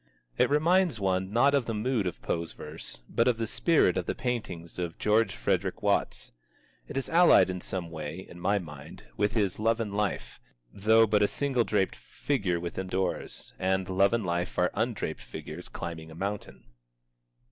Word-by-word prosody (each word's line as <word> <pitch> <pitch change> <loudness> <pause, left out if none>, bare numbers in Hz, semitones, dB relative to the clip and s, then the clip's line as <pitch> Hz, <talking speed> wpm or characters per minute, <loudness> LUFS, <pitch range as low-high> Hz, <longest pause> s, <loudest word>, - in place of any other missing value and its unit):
It - - +3
reminds 165 - +3
one, 95 -1 0
not 130 +6 +4
of 140 -4 +2
the 115 - -2
mood 110 -2 0
of 90 - -6
Poe's 85 0 -2
verse, 75 -4 -9
but 115 - +1
of 125 -2 +3
the 115 - -1
spirit 130 - +3
of 90 - -2
the - - -1
paintings 95 -10 -4
of 85 -2 -3
George 105 -1 +2
Frederick 95 +2 -1
Watts. 100 -1 0 0.6
It - - -6
is 135 - -1
allied 170 - +6
in 90 -1 -5
some 90 -3 -4
way, 80 +3 -6
in 90 - -12
my 100 +3 +2
mind, 75 -7 -9
with 105 +1 +1
his 100 -4 0
"Love 115 +1 +2
and 105 -3 -3
Life," 105 -1 -2 0.3
though 110 +3 +5
but 105 -1 +2
a 105 - +5
single 135 -2 0
draped 95 -1 +1
figure 100 -12 -2
within 90 +2 -4
doors, 95 -1 -3
and 95 0 0
"Love 95 +1 +3
and 115 -3 0
Life" 85 +1 -2
are 90 0 +2
undraped 110 +1 -2
figures, 80 +3 -8
climbing 80 -2 -6
a 80 - -11
mountain. 100 +4 -5
100 Hz, 180 wpm, -29 LUFS, 90-115 Hz, 0.6 s, allied